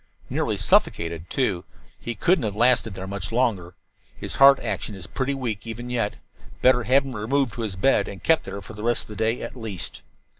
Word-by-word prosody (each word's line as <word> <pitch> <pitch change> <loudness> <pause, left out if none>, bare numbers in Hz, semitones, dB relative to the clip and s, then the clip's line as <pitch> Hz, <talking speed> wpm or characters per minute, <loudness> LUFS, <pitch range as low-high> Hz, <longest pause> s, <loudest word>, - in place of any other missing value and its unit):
"Nearly - - 0
suffocated, 85 0 +1
too. 100 -10 0 0.4
He 120 - -5
couldn't 170 - +2
have 105 -2 -2
lasted 120 -2 +3
there 95 - -6
much 95 0 -4
longer. 100 -8 0 0.4
His - - -6
heart 135 0 +8
action 105 - -4
is 95 -2 -7
pretty 135 +6 -2
weak 115 -5 -4
even 120 +2 -6
yet. 115 -4 -1 0.5
Better 125 -2 +5
have 135 +2 +4
him 130 -3 -6
removed 120 +3 0
to 115 - -5
his 105 -4 -3
bed, 100 +1 +2
and 100 - -9
kept 160 -1 +3
there 100 - -6
for - - -11
the 105 - -9
rest 120 +2 +1
of - - -16
the 105 - -8
day, 115 +2 0
at 115 - -7
least." 110 -7 -5
115 Hz, 210 wpm, -24 LUFS, 100-125 Hz, 0.5 s, heart